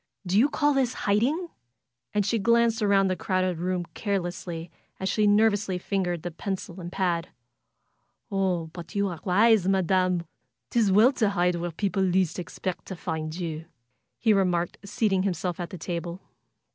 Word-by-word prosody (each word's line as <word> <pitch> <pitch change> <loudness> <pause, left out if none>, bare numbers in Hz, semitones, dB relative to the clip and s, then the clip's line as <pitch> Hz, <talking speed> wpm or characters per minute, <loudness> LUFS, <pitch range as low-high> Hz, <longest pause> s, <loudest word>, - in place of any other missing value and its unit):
Do 180 +1 -1
you 270 +6 +5
call 295 -1 +2
this 260 -3 +1
hiding?" 265 - +1 0.6
And 205 -1 +1
she 225 +3 +1
glanced 235 +1 +3
around 200 -1 +4
the 185 - 0
crowded 185 -2 -1
room 180 0 -1
carelessly 175 -4 -3 0.3
as 190 - -2
she 210 +1 +2
nervously 205 -2 +3
fingered 180 -3 -2
the 175 - -4
pencil 185 +1 -5
and 175 0 -7
pad. 175 -3 -1 1.0
^'Oh, 180 -5 0
but 170 +3 -9
you 200 -1 +1
are 170 -3 -6
wise. 210 +1 +4
Madam! 185 -2 +2 0.5
'Tis 225 -5 +3
well 215 +7 +6
to 220 -6 +2
hide 180 -2 +2
where 175 +1 -3
people 195 +3 -1
least 185 -2 +1
expect 180 +1 -5
to 190 - -5
find 160 -2 -4
you!" 165 -3 -4 0.5
he 220 -2 +3
remarked, 180 -3 +1
seating 200 -1 +1
himself 180 -2 -2
at 175 - -4
the 185 - -7
table. 170 +1 -4
190 Hz, 160 wpm, -26 LUFS, 175-205 Hz, 1.0 s, well